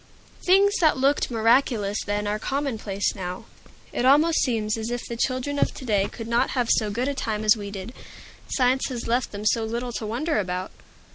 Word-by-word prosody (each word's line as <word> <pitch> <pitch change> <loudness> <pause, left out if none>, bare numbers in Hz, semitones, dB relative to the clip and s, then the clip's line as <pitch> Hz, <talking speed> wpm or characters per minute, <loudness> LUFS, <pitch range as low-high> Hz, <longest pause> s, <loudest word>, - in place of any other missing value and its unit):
Things 395 +2 +5
that 315 -5 +3
looked 275 +2 +2
miraculous 225 -3 +2
then 205 0 -2
are 210 +1 -1
commonplace 225 -8 -2
now. 185 -2 -6 0.5
It - - -1
almost 300 +5 +5
seems 220 -4 0
as 225 0 -4
if 240 0 -3
the 235 - -5
children 255 +4 -1
of - - +1
to 260 - -8
day 205 -4 +2
could 225 -2 -8
not 235 0 +2
have 245 -2 +1
so 215 -2 +2
good 240 +6 -1
a 285 - 0
time 215 -5 -3
as 215 +1 +5
we 205 -2 -6
did, 200 +3 -7 0.6
science 255 0 +2
has 245 -3 -5
left 240 +2 0
them 205 +1 -6
so 225 +1 +2
little 235 +2 -3
to 220 - -4
wonder 255 +6 -1
about. 185 -1 -3
230 Hz, 200 wpm, -24 LUFS, 210-260 Hz, 0.6 s, Things